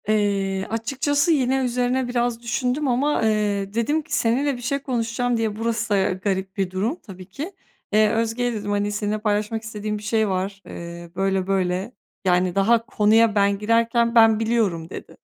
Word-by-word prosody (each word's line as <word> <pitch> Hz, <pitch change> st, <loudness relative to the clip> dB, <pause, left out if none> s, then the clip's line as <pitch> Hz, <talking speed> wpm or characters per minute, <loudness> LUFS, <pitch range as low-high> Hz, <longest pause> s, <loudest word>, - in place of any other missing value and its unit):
Eee, 200 Hz, -2 st, 0 dB
açıkçası 275 Hz, +7 st, 0 dB
yine 265 Hz, -3 st, +2 dB
üzerine 250 Hz, +1 st, 0 dB
biraz 240 Hz, -1 st, -1 dB
düşündüm 250 Hz, +4 st, -1 dB
ama, 270 Hz, +4 st, +1 dB
eee, 205 Hz, -2 st, 0 dB
dedim 235 Hz, +8 st, +1 dB
ki: -, -, -4 dB
"Seninle 255 Hz, +4 st, +1 dB
bir -, -, -10 dB
şey 275 Hz, +4 st, -1 dB
konuşacağım." 245 Hz, -2 st, -1 dB
diye, 220 Hz, -2 st, -1 dB
burası 230 Hz, +1 st, -2 dB
da 195 Hz, -2 st, +2 dB
garip 190 Hz, +1 st, -3 dB
bir 190 Hz, -2 st, -1 dB
durum 205 Hz, -, -1 dB
tabii 185 Hz, -2 st, -10 dB
ki. 300 Hz, -, -6 dB, 0.4 s
"E, 215 Hz, +1 st, +5 dB
Özge'ye," 230 Hz, +2 st, 0 dB
dedim, 205 Hz, -2 st, -4 dB
"hani, 205 Hz, 0 st, 0 dB
seninle 210 Hz, 0 st, -1 dB
paylaşmak 215 Hz, +1 st, -1 dB
istediğim 215 Hz, -1 st, -4 dB
bir 210 Hz, -, -10 dB
şey 220 Hz, 0 st, +1 dB
var." 195 Hz, +1 st, -3 dB
Eee, 170 Hz, 0 st, -8 dB
böyle 195 Hz, 0 st, 0 dB
böyle, 190 Hz, +2 st, 0 dB, 0.3 s
yani, 180 Hz, -1 st, +2 dB
daha 225 Hz, +4 st, +3 dB
konuya 215 Hz, +1 st, +3 dB
ben 200 Hz, -1 st, +2 dB
girerken, 230 Hz, +2 st, +2 dB
"Ben 225 Hz, -1 st, +6 dB
biliyorum." 215 Hz, -8 st, 0 dB
dedi. -, -, -9 dB
220 Hz, 170 wpm, -23 LUFS, 200-240 Hz, 0.4 s, Ben